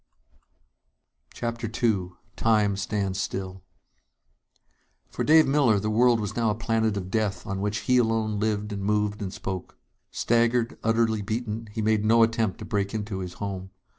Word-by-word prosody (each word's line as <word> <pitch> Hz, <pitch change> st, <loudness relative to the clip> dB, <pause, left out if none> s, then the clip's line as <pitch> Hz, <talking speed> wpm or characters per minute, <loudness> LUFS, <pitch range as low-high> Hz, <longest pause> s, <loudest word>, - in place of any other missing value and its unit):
_" -, -, -19 dB
CHAPTER 115 Hz, 0 st, -3 dB
II 110 Hz, -6 st, 0 dB, 0.2 s
Time 105 Hz, -3 st, +2 dB
Stands 100 Hz, -1 st, -2 dB
Still 95 Hz, -1 st, -4 dB, 1.5 s
For -, -, -2 dB
Dave 155 Hz, +1 st, +6 dB
Miller, 135 Hz, -7 st, +3 dB
the 105 Hz, +2 st, -2 dB
world 120 Hz, +1 st, +4 dB
was 105 Hz, -2 st, -4 dB
now 115 Hz, -2 st, +1 dB
a 105 Hz, -, 0 dB
planet 110 Hz, -2 st, 0 dB
of 95 Hz, -1 st, -5 dB
death 105 Hz, -3 st, -1 dB
on 100 Hz, -2 st, -3 dB
which 105 Hz, +1 st, -1 dB
he 125 Hz, -, +2 dB
alone 110 Hz, -3 st, +1 dB
lived 105 Hz, -1 st, -1 dB
and 100 Hz, -, -4 dB
moved 105 Hz, 0 st, 0 dB
and 95 Hz, -2 st, -3 dB
spoke. 95 Hz, -2 st, -6 dB, 0.3 s
Staggered, 120 Hz, 0 st, +1 dB
utterly 115 Hz, -1 st, +2 dB
beaten, 110 Hz, +1 st, -3 dB
he 110 Hz, +1 st, -3 dB
made 110 Hz, -1 st, +2 dB
no 115 Hz, +1 st, +5 dB
attempt 115 Hz, -4 st, 0 dB
to -, -, -8 dB
break 100 Hz, 0 st, -2 dB
into 105 Hz, -2 st, -3 dB
his 90 Hz, -1 st, -5 dB
home. 95 Hz, -2 st, -5 dB
110 Hz, 165 wpm, -26 LUFS, 100-115 Hz, 1.5 s, Dave